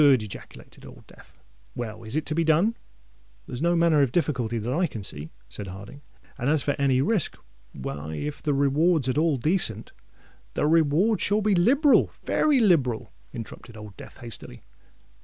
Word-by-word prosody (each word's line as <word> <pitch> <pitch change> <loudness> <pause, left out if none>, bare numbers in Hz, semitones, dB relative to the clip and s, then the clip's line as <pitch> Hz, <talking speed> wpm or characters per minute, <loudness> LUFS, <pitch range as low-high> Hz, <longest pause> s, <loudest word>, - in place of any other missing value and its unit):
ejaculated 130 -8 0
Old - - -13
Death. - - -19 0.4
"Well—is 115 0 -6
it 155 0 0
to 155 - -2
be 165 +2 +1
done?" 165 +9 +3 0.7
"There's 125 +1 -7
no 170 +1 +2
manner 165 -3 +4
of 135 -4 +2
difficulty 125 -8 0
that 115 +3 -2
I 175 +4 +2
can 110 -8 -7
see," 75 -3 -6 0.2
said 100 +6 -7
Harding; 100 +9 -10 0.4
"and 125 - 0
as 155 -1 +3
for 145 - +1
any 135 -2 +3
risk—why 70 - -4
if 145 - -5
the 145 -2 0
reward's 145 +2 +2
at 130 - +1
all 160 -3 +2
decent——" 125 - 0 0.6
"The - - +1
reward 165 +7 +3
shall 205 +2 +2
be 210 0 +2
liberal—very 280 - +3
liberal," 140 - +2 0.2
interrupted 115 -1 -9
Old 105 -2 -10
Death - - -12
hastily. 115 - -9
140 Hz, 160 wpm, -25 LUFS, 115-170 Hz, 0.7 s, manner